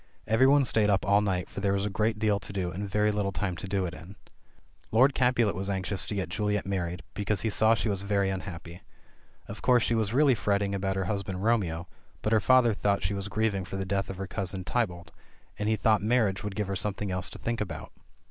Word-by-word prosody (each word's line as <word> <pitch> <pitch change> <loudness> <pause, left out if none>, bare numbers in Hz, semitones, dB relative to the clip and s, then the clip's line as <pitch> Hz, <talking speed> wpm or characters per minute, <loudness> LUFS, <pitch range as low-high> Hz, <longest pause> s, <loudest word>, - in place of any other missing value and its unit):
Every 115 +5 +4
one 140 0 +5
stayed 110 -3 +3
up 100 -1 +2
all 100 +1 +4
night, 95 -3 -1
for - - -7
there 100 0 +1
was 100 0 0
a - - -1
great 110 +2 0
deal 105 -1 +1
to - - -8
do, 95 -3 -2
and 100 +4 -5
very 105 +2 +2
little 105 -2 -1
time 95 -1 -2
to 95 - -6
do 95 -1 0
it 85 - -5
in. 90 +3 -11 0.8
Lord 130 +5 +5
Capulet 125 -5 +2
was 95 +3 -3
anxious 95 0 -2
to 105 - -3
get 95 -2 -2
Juliet 105 -2 -1
married, 90 -2 -3
because 100 -1 -1
he 110 - -1
saw 110 +2 +4
she 115 - -1
was 100 -2 -1
very 100 -1 +1
unhappy. 85 -2 -7 0.7
Of 100 - -8
course 125 -3 +4
she - - +1
was 110 -2 0
really 140 +2 +4
fretting 100 -3 0
about 95 0 -1
her 95 -1 -1
husband 95 -1 -3
Romeo, 95 -7 0 0.4
but 110 - +1
her 110 - +5
father 125 +1 +4
thought 100 -1 0
she 90 +4 0
was 100 0 -4
grieving 100 -2 0
for 90 - -7
the 95 - -3
death 100 +1 -1
of 95 - -5
her 95 - -4
cousin 95 -1 -4
Tybalt,'^nd 100 0 -4
he 110 - +3
thought 110 0 +2
marriage 105 -3 +1
would 105 -1 -4
give 105 0 -1
her 100 +1 -3
something 100 +1 -3
else 90 -1 -1
to - - -10
think 115 -1 -3
about. 105 - -5
100 Hz, 235 wpm, -28 LUFS, 95-110 Hz, 0.8 s, one